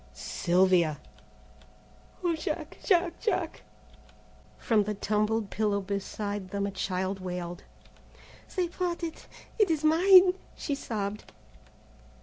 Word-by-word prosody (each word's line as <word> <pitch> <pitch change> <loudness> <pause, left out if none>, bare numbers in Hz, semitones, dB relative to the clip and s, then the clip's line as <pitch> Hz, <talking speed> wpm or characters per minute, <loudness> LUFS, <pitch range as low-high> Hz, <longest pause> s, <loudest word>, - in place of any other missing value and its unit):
"Sylvia!" 175 - +2 1.2
"O 345 -2 +2
Jack! 315 - -4
Jack! 350 -3 +2
Jack!" 365 -7 -1 1.0
From 215 -3 +2
the 210 0 -2
tumbled 215 +1 0
pillow 205 -2 +1
beside 200 0 -4
them 200 +1 -2
a 200 - -2
child 190 0 -2
wailed. 180 -1 -5 0.9
"They 365 -2 +1
brought 345 0 -3
it; 325 -1 -6 0.3
it 420 -4 +4
is 315 -2 0
mine," 365 +4 +7 0.2
she 290 - -3
sobbed. 210 -6 -4
210 Hz, 110 wpm, -29 LUFS, -, 1.2 s, mine